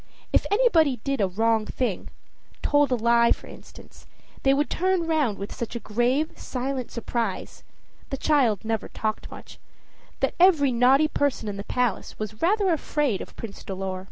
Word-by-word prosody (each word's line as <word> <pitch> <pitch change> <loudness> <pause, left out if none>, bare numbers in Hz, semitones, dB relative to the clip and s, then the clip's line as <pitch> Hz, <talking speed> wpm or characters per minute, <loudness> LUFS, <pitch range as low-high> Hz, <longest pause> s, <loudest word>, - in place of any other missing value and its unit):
If - - +3
anybody 340 - +3
did 275 -4 -1
a 195 - +3
wrong 220 +3 +1
thing 230 -8 -2 0.6
told 290 -2 +3
a - - +4
lie, 235 0 +3
for - - 0
instance - - -14 0.3
they 270 - +3
would 285 +2 +2
turn 370 -1 0
round 300 -10 +1
with 200 - -6
such 235 0 -5
a - - -2
grave, 245 +8 0
silent 255 0 -4
surprise 230 -3 -4 0.5
the 270 - -3
child 250 -10 +2
never 225 -1 -2
talked 215 -1 -4
much - - -12 0.6
that - - 0
every 325 -7 +5
naughty 260 +5 +4
person 285 -7 -1
in 200 -1 -4
the 200 - -5
palace 245 -3 -2
was 215 0 -6
rather 385 +1 +3
afraid 290 - -1
of - - -10
Prince 215 -4 -8
Dolor. 190 -1 -4
250 Hz, 165 wpm, -25 LUFS, 220-295 Hz, 0.6 s, every